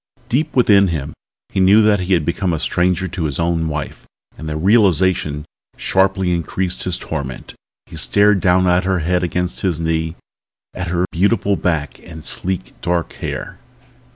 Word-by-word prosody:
Deep 150 Hz, +6 st, 0 dB
within 100 Hz, -6 st, +5 dB
him 75 Hz, -4 st, -3 dB, 0.4 s
he -, -, -2 dB
knew 100 Hz, +4 st, +6 dB
that 105 Hz, -2 st, +3 dB
he 90 Hz, +1 st, 0 dB
had 80 Hz, -4 st, -1 dB
become 85 Hz, +2 st, -1 dB
a -, -, 0 dB
stranger 90 Hz, +3 st, 0 dB
to 90 Hz, -1 st, -4 dB
his 70 Hz, -3 st, -2 dB
own 85 Hz, -1 st, 0 dB
wife 75 Hz, -3 st, -5 dB, 0.3 s
and 80 Hz, -, -7 dB
the 75 Hz, -, -3 dB
realization 95 Hz, -6 st, +2 dB, 0.3 s
sharply 95 Hz, -1 st, +1 dB
increased 90 Hz, +2 st, -2 dB
his 90 Hz, -1 st, -1 dB
torment. 70 Hz, -5 st, -6 dB, 0.3 s
He -, -, -11 dB
stared 100 Hz, +5 st, +4 dB
down 90 Hz, 0 st, +3 dB
at 90 Hz, 0 st, +3 dB
her 95 Hz, -1 st, 0 dB
head 90 Hz, +3 st, +1 dB
against 90 Hz, 0 st, -2 dB
his 90 Hz, -5 st, 0 dB
knee, 80 Hz, 0 st, -1 dB, 0.6 s
at 90 Hz, -1 st, -4 dB
her 90 Hz, +1 st, 0 dB
beautiful 100 Hz, +3 st, +1 dB
back 80 Hz, -6 st, -2 dB
and 80 Hz, -1 st, -11 dB
sleek, 95 Hz, +1 st, -2 dB
dark 85 Hz, -1 st, -1 dB
hair. -, -, -6 dB
90 Hz, 165 wpm, -18 LUFS, 80-95 Hz, 0.6 s, knew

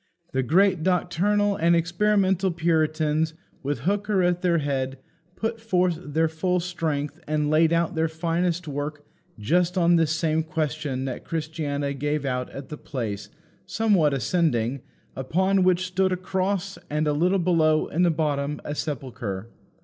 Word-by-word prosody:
The 130 Hz, -, +1 dB
great 180 Hz, +6 st, +3 dB
doctrinal 190 Hz, +4 st, +1 dB
and 170 Hz, +1 st, +4 dB
experimental 190 Hz, +2 st, +2 dB
Puritans, 160 Hz, -2 st, +1 dB, 0.3 s
with 145 Hz, +1 st, -2 dB
Hooker 200 Hz, 0 st, +1 dB
at 175 Hz, 0 st, +1 dB
their 175 Hz, -2 st, +2 dB
head, 135 Hz, -3 st, -2 dB, 0.4 s
put 225 Hz, +2 st, -3 dB
forth 180 Hz, -6 st, +1 dB
their 160 Hz, +2 st, +1 dB
full 180 Hz, +3 st, 0 dB
strength 160 Hz, -5 st, -3 dB
and 150 Hz, 0 st, 0 dB
laid 160 Hz, +1 st, +4 dB
out 170 Hz, 0 st, +1 dB
their 160 Hz, 0 st, +1 dB
finest 170 Hz, +1 st, -1 dB
work 145 Hz, +1 st, -4 dB, 0.3 s
just 175 Hz, -, +1 dB
on 170 Hz, -1 st, +4 dB
this 165 Hz, -2 st, +2 dB
same 160 Hz, 0 st, +1 dB
question 150 Hz, -4 st, -2 dB
that 130 Hz, -, -5 dB
Christiana 150 Hz, -3 st, -3 dB
gave 145 Hz, +1 st, -2 dB
out 125 Hz, -1 st, -2 dB
at 135 Hz, -1 st, -9 dB
the 150 Hz, -, -6 dB
place, 105 Hz, -8 st, -5 dB, 0.4 s
somewhat 190 Hz, -10 st, +2 dB
ascending, 130 Hz, -, 0 dB, 0.3 s
upon 190 Hz, +9 st, +1 dB
which 185 Hz, 0 st, +3 dB
stood 185 Hz, +1 st, +1 dB
a 185 Hz, -, 0 dB
cross, 190 Hz, 0 st, -2 dB
and 150 Hz, +1 st, 0 dB
a 150 Hz, -, +2 dB
little 180 Hz, +6 st, +2 dB
below, 165 Hz, -3 st, +3 dB
in 165 Hz, -, -1 dB
the 175 Hz, -, +5 dB
bottom, 150 Hz, -2 st, -1 dB
a 145 Hz, -, -3 dB
sepulchre. 120 Hz, -, -4 dB
160 Hz, 150 wpm, -25 LUFS, 145-180 Hz, 0.4 s, the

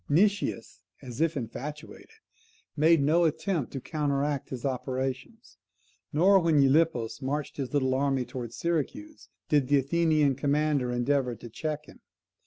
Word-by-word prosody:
Nicias, 195 Hz, -, +1 dB, 0.2 s
as 125 Hz, +1 st, -6 dB
if 165 Hz, -1 st, +1 dB
infatuated, 145 Hz, +6 st, -7 dB, 0.7 s
made 160 Hz, 0 st, +4 dB
no 160 Hz, +5 st, +3 dB
attempt 165 Hz, -, -1 dB
to 135 Hz, -, -3 dB
counteract 145 Hz, -1 st, -2 dB
his 130 Hz, -1 st, -6 dB
operations; 130 Hz, -, -4 dB, 0.5 s
nor, 190 Hz, +6 st, +5 dB
when 165 Hz, -3 st, +2 dB
Gylippus 135 Hz, -5 st, +2 dB
marched 145 Hz, +2 st, -3 dB
his 135 Hz, -3 st, -4 dB
little 130 Hz, -3 st, +1 dB
army 135 Hz, -1 st, 0 dB
towards 120 Hz, -3 st, -7 dB
Syracuse, 210 Hz, -, -3 dB, 0.2 s
did 145 Hz, -4 st, +2 dB
the 145 Hz, +1 st, +4 dB
Athenian 155 Hz, 0 st, +2 dB
commander 140 Hz, -1 st, 0 dB
endeavour 125 Hz, 0 st, 0 dB
to 120 Hz, -, -11 dB
check 150 Hz, +3 st, -4 dB
him. -, -, -16 dB
145 Hz, 135 wpm, -28 LUFS, 130-160 Hz, 0.7 s, nor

